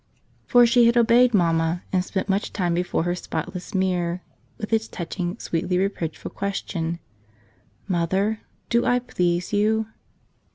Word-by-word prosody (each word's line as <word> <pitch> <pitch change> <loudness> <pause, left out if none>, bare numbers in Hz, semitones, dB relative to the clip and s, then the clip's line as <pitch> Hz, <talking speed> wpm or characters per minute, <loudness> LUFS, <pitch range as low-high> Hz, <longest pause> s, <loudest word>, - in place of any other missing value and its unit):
For 245 -1 +6
she 235 0 +5
had 235 +1 +3
obeyed 240 +1 +5
Mamma 165 -3 +1
and 185 -1 +2
spent 190 +1 -3
much 195 +1 0
time 175 -4 0
before 175 -1 0
her 175 +1 0
spotless 180 +2 -5
mirror 180 -2 0 0.3
with 220 0 -5
its 220 0 +2
touching, 175 +1 -4
sweetly 180 +2 -1
reproachful 185 -4 -2
question, 170 -4 -3 0.9
"Mother, 190 +4 0 0.3
do 235 0 +3
I 245 - +3
please 180 -5 -1
you?" 220 +2 +2
185 Hz, 135 wpm, -24 LUFS, 175-220 Hz, 0.9 s, For